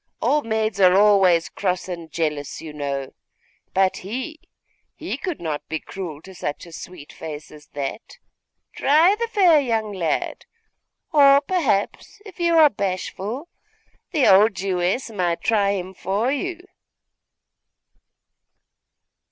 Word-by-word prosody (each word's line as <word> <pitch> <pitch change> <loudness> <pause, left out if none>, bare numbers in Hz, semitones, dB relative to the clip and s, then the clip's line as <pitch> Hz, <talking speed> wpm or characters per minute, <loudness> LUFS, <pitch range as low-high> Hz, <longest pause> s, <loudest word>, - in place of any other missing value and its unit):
Old 295 -5 +1
maids 220 -2 -1
are 185 0 +6
always 195 -5 +5
cross 185 -2 -2
and 170 -3 -7
jealous, 150 -3 -3
you 155 -2 -9
know. 140 -2 -4 0.6
But 190 0 +2
he 260 - -6 0.6
he - - -4
could 360 -5 -5
not 155 -3 -4
be 160 0 -2
cruel 165 -6 -8
to 190 - -12
such 150 -4 -5
a 170 - -13
sweet 165 -2 -10
face 155 -2 -8
as 150 -1 -14
that. 140 +9 -6 0.6
Try 315 +7 +4
the 465 +2 -2
fair 370 -8 +5
young 225 -6 -1
lad! 170 -5 -2 0.7
Or, 280 -3 +7
perhaps, 280 - -1
if 385 -3 -13
you 340 -1 +3
are 315 -2 +8
bashful, 200 - -4 0.6
the 305 -7 +2
old 200 +2 +6
Jewess 190 +5 -1
might 175 -5 -1
try 205 -3 +2
him 190 -1 -5
for 200 +7 -1
you? 355 +5 -3
195 Hz, 130 wpm, -22 LUFS, 170-275 Hz, 0.7 s, are